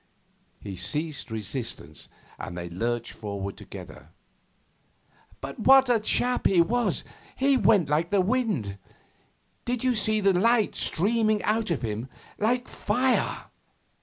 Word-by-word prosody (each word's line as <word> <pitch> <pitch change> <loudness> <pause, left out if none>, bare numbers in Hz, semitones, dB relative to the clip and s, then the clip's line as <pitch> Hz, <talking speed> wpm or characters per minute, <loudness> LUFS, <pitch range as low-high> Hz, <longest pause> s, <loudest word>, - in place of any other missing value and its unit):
He 95 -2 -7
ceased 150 - -3
resistance, 110 - -5 0.3
and 85 - -6
they 85 0 -6
lurched 115 +6 -2
forward 100 -2 -5
together. - - -11 1.3
'But 135 +1 -7
what 265 +2 +6
a 235 - +3
chap 245 +3 +1
he 185 - +3
was! 235 +8 +1 0.3
He 275 +1 +3
went 205 - +4
like 155 +4 +1
the 205 - +2
wind. 185 - 0 0.8
Did 245 0 -2
you 255 -1 +3
see 215 -1 +2
the 195 -2 +3
light 220 +4 +3
streaming 215 +3 +1
out 220 0 0
of 165 -7 -1
him 110 +3 -3 0.3
like 245 +4 +1
fire? 255 +1 0
195 Hz, 130 wpm, -26 LUFS, -, 1.3 s, what